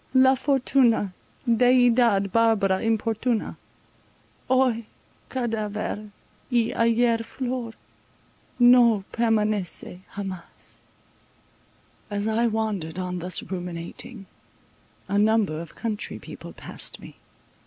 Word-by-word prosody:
la 260 0 +6
fortuna 255 -6 +2 0.3
deidad 235 -4 +4
barbara 210 -4 +3
importuna, 225 +1 0 0.9
oy 255 -4 +2 0.4
cadaver 215 -3 -3 0.4
y 235 -2 +1
ayer 230 0 +3
flor, 245 0 -4 0.8
no 240 -4 +6
permanece 215 -6 0 0.2
jamas! 190 -3 -8 1.3
As 205 0 -2
I 225 +2 +2
wandered 215 -7 -2
on 180 -1 -3
thus 180 +1 -1
ruminating, 180 +5 -6 0.8
a 200 +2 +1
number 210 -7 +2
of 170 - -11
country 220 -3 -4
people - - -10
passed - - -1
me. - - -13
225 Hz, 90 wpm, -25 LUFS, 200-240 Hz, 1.3 s, la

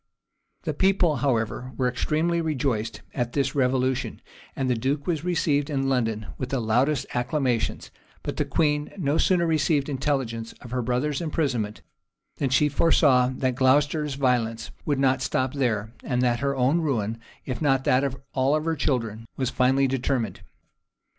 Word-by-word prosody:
[] - - -48
The - - -2
people, 185 -5 +2
however, 125 -1 -1
were 130 - +1
extremely 155 +7 0
rejoiced 125 -9 -1
at 120 -1 -2
this 140 -1 0
revolution; 130 -1 0 0.4
and 135 - -1
the 125 - +3
duke 135 +5 -1
was 160 -4 -1
received 150 -4 +1
in 135 -2 0
London 115 -5 0
with 130 - -3
the 135 - 0
loudest 125 +5 +1
acclamations: 125 -1 -1 0.3
but - - -4
the - - +2
queen 150 -1 0
no 150 -4 0
sooner 180 -2 +3
received 155 -3 +1
intelligence 130 -5 -2
of 120 - -13
her 125 0 0
brother's 125 +5 -1
imprisonment, 135 -10 -2 0.5
than 140 - 0
she 140 +4 +4
foresaw 140 -4 +4
that 130 0 -1
Glocester's 145 +3 +2
violence 120 -4 0 0.2
would 145 -2 +1
not 135 -1 +2
stop 130 0 0
there, 115 -5 -1
and 125 -2 0
that 120 -1 +2
her 140 +1 0
own 135 +6 +2
ruin, 115 -7 -1 0.3
if 125 +1 -4
not 135 -3 +2
that 130 +1 +3
of 135 -2 -2
all 135 +3 +2
her 160 +1 -1
children, 115 -6 -2
was 130 -2 -1
finally 130 +1 +3
determined. 130 -2 -1
135 Hz, 160 wpm, -25 LUFS, 125-145 Hz, 0.5 s, she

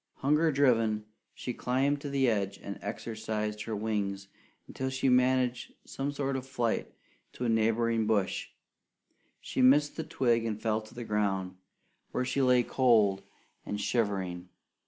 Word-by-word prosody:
Hunger 150 +4 +2
driven, 115 -6 +2 0.3
she 125 - -4
climbed 135 +4 0
to 145 - -5
the 135 -2 +2
edge 100 -3 0
and 100 - -7
exercised 105 0 -4
her 110 - -3
wings 100 -2 -2 0.4
until 130 0 -3
she 130 0 0
managed 125 -1 +2
some 140 +1 -3
sort 140 -1 -2
of 130 0 -4
flight 120 -4 -1 0.4
to 125 - -4
a - - +1
neighbouring 115 0 +2
bush. 105 -4 0 0.9
She - - -2
missed 145 +3 +5
the - - -2
twig 120 -3 +1
and 110 -2 -3
fell 110 -1 0
to 110 +2 -15
the 120 - -5
ground, 100 -4 -1 0.6
where 125 - 0
she 130 +2 0
lay 125 -2 +4
cold 110 -7 +3 0.4
and 105 - -4
shivering. 95 -5 -1
115 Hz, 150 wpm, -30 LUFS, 105-130 Hz, 0.9 s, missed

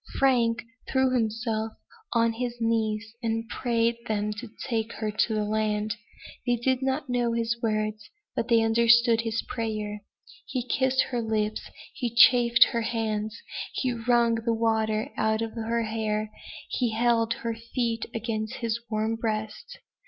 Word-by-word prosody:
Frank 235 -4 +3 0.3
threw 265 -1 +3
himself 225 -2 -1 0.4
on 230 -1 +3
his 240 +1 -3
knees, 220 -1 0
and 225 -1 -1
prayed 235 -1 0
them 210 -1 -1
to 225 +3 -8 0.2
take 225 -2 -1
her 215 -1 -3
to 215 0 +1
land. 215 0 0 0.5
They 245 - +4
did 255 +2 0
not 265 +1 -1
know 245 -2 +1
his 230 0 -1
words, 215 -1 -1 0.3
but 230 - -1
they 230 -1 +4
understood 235 +1 +5
his 225 -1 -2
prayer. 215 -3 -3 0.5
He 255 -2 -3
kissed 260 0 +2
her 240 -2 0
lips 215 -1 -1 0.2
he 245 - -2
chafed 240 0 +7
her 235 - 0
hands 220 -1 -2 0.3
he 255 -2 0
wrung 235 0 +2
the 230 -1 +1
water 220 -1 +1
out 220 +1 +1
of 225 - -4
her 230 0 -1
hair 215 -1 -2 0.4
he 240 -4 -1
held 230 0 +2
her 230 0 -3
feet 230 0 -2
against 225 +1 -3
his 230 -2 -2
warm 220 +1 0
breast. 220 - -4
230 Hz, 145 wpm, -27 LUFS, 220-235 Hz, 0.5 s, chafed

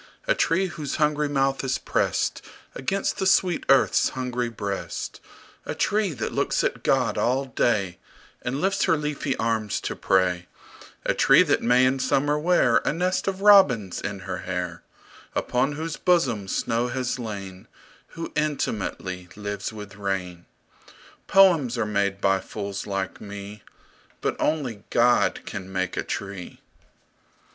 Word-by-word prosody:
A - - +4
tree 190 - +2
whose 155 -6 -4
hungry 150 -1 +1
mouth 135 -1 +1
is 130 -1 0
prest - - -1 0.3
Against 190 +9 -2
the 190 - +1
sweet 185 -2 +3
earth's 135 0 +4
hungry 125 -2 -3
breast; 100 -4 -5 0.4
A - - -5
tree 210 -2 +1
that - - -3
looks - - 0
at - - -1
God - - +1
all 130 +3 +1
day 105 -7 0 0.4
And 130 +3 -3
lifts 195 +4 +1
her 165 - +3
leafy 150 -2 -2
arms 110 -2 0
to - - -3
pray; 90 -2 +1 0.6
A - - +2
tree - - +6
that - - +1
may 125 +2 +4
in 130 +1 +1
summer 145 +3 +1
wear 155 -7 +4
A - - 0
nest 180 +5 -1
of 195 0 -2
robins 145 - +5
in 100 -2 -4
her 95 - -4
hair; 90 -2 -4 0.5
Upon 135 +4 0
whose 160 +1 -4
bosom 130 - +1
snow 115 +5 0
has 125 0 -2
lain; 100 -5 -7 0.5
Who 165 - -5
intimately 100 -11 -2
lives 105 -1 -4
with 105 -1 -10
rain. 95 -3 -4 0.8
Poems 165 -11 +5
are 115 - 0
made 100 -2 0
by 95 -1 +2
fools 100 -1 -6
like 95 -1 -3
me, 100 0 -8 0.6
But - - -1
only 130 -9 -1
God 120 +1 +3
can 95 -2 -7
make 95 -1 -2
a - - 0
tree! 100 -3 -6
120 Hz, 145 wpm, -25 LUFS, 100-150 Hz, 0.8 s, tree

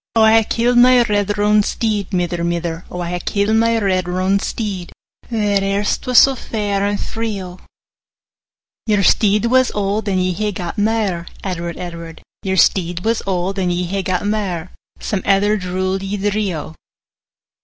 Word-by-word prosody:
'O 225 - +5
I 220 - +6
hae - - -2
kill'd 240 +2 +2
my 250 0 +6
red 205 -2 0
roan 210 +1 +4
steed, 210 -2 -2
Mither, 175 -2 -1
mither; 170 0 -2
O 180 - -5
I 175 0 -3
hae 180 - -2
kill'd 200 +4 0
my 230 +1 +3
red 185 -4 0
roan 185 +2 +1
steed, 195 -5 -4 0.4
15 230 -2 -2
That 200 -1 +2
erst 200 +4 -1
was 250 -1 +2
sae 275 - +7
fair 205 -5 -2
and 205 0 -1
free, 225 -3 -3
O.' 180 -1 -9 1.3
'Your 205 -2 +2
steed 210 +3 +3
was 255 +1 +3
auld, 205 +1 -1
and 190 -1 +1
ye 185 0 0
hae 210 +3 -2
got 180 +3 -5
mair, 205 -5 0 0.2
Edward, 170 -3 -4
Edward; 170 -2 -8 0.2
Your 190 -1 -2
steed 175 +1 +2
was 225 0 +1
auld, 190 +1 -1
and 180 -2 0
ye 175 +1 -1
hae 195 +3 -2
got 185 0 -2
mair; 190 -5 -2 0.3
Some 200 -3 -2
other 200 +2 +3
dule 185 0 -2
ye 195 +1 -3
dree, 205 -2 -1
O. 155 +1 -7
195 Hz, 180 wpm, -18 LUFS, 180-210 Hz, 1.3 s, sae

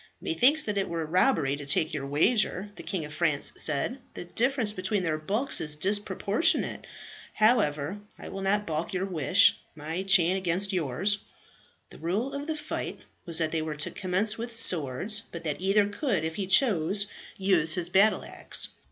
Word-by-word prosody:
"Methinks 305 0 +2
that 205 -2 -1
it 195 - -2
were 165 -1 -3
robbery 160 - +2
to 145 - -8
take 155 +3 0
your 140 -2 -4
wager," 200 - +1
the - - -9
King 180 -6 -4
of 150 - -10
France 155 -3 0
said. 155 - -2 0.2
"The - - -6
difference 235 +3 0
between 190 0 -2
their 155 -2 -1
bulk 210 - 0
is 150 -2 +2
disproportionate. 205 - 0 0.5
However, 190 - +2 0.2
I - - -9
will 195 - -6
not 205 +2 +1
baulk 160 +4 -3
your 185 +1 -1
wish. 185 +3 +3 0.2
My 160 +4 -4
chain 190 -2 +4
against 190 +2 -1
yours." 180 +5 0 0.7
The - - -13
rule 200 +11 -2
of 280 +1 -5
the 315 -1 -3
fight 300 - -5 0.3
was 165 -2 +1
that 160 -2 +1
they 160 - -1
were 155 -1 -4
to 150 - +1
commence 200 +4 -1
with 235 0 -6
Swords, 185 - +3
but 170 -1 -8
that 155 +1 -3
either 200 +2 +3
could, 205 - -1
if 160 - -3
he 195 +2 -4
chose, 200 - +2 0.3
use 180 -4 +4
his 175 -2 -2
battle 200 +4 +4
axe. - - +1
185 Hz, 180 wpm, -27 LUFS, 160-210 Hz, 0.7 s, chain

